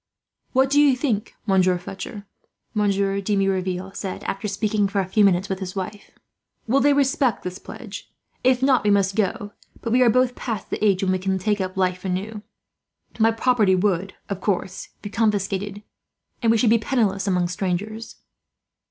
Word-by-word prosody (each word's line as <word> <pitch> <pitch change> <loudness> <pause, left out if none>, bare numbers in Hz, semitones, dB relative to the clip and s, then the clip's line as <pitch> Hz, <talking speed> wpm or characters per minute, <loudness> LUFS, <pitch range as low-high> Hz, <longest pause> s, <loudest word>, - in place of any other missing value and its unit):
"What 265 +1 +3
do 290 +1 +5
you 285 -3 +5
think, 235 -6 -2
Monsieur 185 -3 +3
Fletcher?" 195 +3 -8 0.5
Monsieur 200 -2 +1
de 205 +1 0
Merouville 190 -1 -1
said, 190 - -5
after 195 +2 -3
speaking 205 0 0
for 200 0 -1
a 190 - +1
few 210 +3 +3
minutes 190 -1 +3
with 190 -1 -3
his 185 -1 -6
wife; 195 +2 -5 0.6
"will 255 +4 +3
they 290 +2 +4
respect 270 -4 +2
this 180 +1 -5
pledge? - - -9 0.3
If 255 0 +3
not 265 -2 +4
we 210 - +2
must 200 -1 +2
go, 205 0 -1 0.3
but 230 - -4
we 250 +2 +4
are 245 - +6
both 255 +2 +3
past 225 -5 -5
the - - -2
age 195 -3 +3
when 190 - +2
we 185 - +1
can 190 +1 0
take 205 +2 0
up 185 0 -4
life 185 -1 0
anew. 195 +3 -3 0.8
My 225 +1 +5
property 225 -4 +3
would, 185 0 0
of 195 -2 -4
course, 190 -1 -2
be 205 - -6
confiscated, 205 -2 -1 0.6
and 230 -2 +3
we 230 - +4
should 220 0 +3
be 230 - +5
penniless 215 -5 0
among 180 -2 +2
strangers." 195 +5 -3
200 Hz, 180 wpm, -23 LUFS, 190-225 Hz, 0.8 s, are